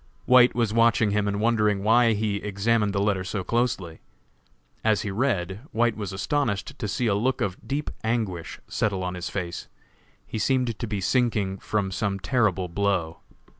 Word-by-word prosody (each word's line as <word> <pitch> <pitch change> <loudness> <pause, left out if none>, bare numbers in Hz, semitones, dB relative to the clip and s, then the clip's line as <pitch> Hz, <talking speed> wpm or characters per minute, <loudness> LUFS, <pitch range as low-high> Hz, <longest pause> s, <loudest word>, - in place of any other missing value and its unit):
White 125 -1 +6
was 115 -3 +1
watching 115 -2 +3
him 105 0 +1
and 100 0 -1
wondered 105 -2 +2
why 115 +3 +4
he 105 -1 -1
examined 105 +1 0
the 100 - -1
letter 100 -3 +1
so 100 0 -3
closely. 115 -8 -1 0.8
As 110 -2 +2
he 105 - -3
read, 95 -5 -1
White 115 0 +2
was 105 -4 -5
astonished 120 +4 -2
to 110 - -2
see 120 +4 -1
a 110 - +2
look 120 +6 0
of 95 -2 -3
deep 145 +2 -2
anguish 110 -7 -2
settle 100 -3 -1
on 90 0 -2
his 90 0 -5
face. 90 -3 -4 0.6
He 110 - -5
seemed 125 -3 0
to 120 - -3
be 105 -2 -3
sinking 105 -3 +1
from 100 -3 -1
some 100 +1 -1
terrible 95 -4 +1
blow. 90 -3 -1
105 Hz, 170 wpm, -25 LUFS, 95-115 Hz, 0.8 s, White